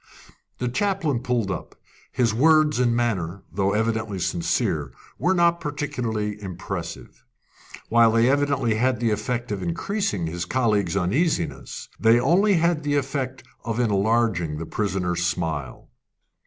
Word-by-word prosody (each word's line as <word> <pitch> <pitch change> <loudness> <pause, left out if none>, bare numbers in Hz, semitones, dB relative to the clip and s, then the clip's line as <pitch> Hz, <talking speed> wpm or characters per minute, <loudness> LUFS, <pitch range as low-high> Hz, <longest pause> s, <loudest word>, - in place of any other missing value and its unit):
The 125 - -2
chaplain 165 - 0
pulled 120 -5 -1
up. 90 - -6 0.4
His 120 -3 +1
words 155 +2 +4
and 120 -2 +2
manner, 100 -6 -1
though 100 +1 0
evidently 110 -1 -1
sincere, 85 -5 -1 0.3
were 185 +3 +2
not 170 -1 +3
particularly 115 -8 -3
impressive. 95 -4 -6 0.6
While 115 -1 +5
they 115 +1 +4
evidently 140 -4 +2
had 125 +2 +1
the 115 -2 +1
effect 120 +2 -2
of 100 -2 -2
increasing 100 - -2
his 85 +2 -3
colleagues' 105 -3 +1
uneasiness, 100 - -1
they 115 +1 +5
only 185 +10 +3
had 170 -1 +2
the 145 -1 0
effect 135 -2 -2 0.2
of 115 0 -3
enlarging 105 -7 +1
the 80 - -5
prisoner's 90 -3 -1
smile. 80 -7 -3
115 Hz, 130 wpm, -24 LUFS, 95-140 Hz, 0.6 s, While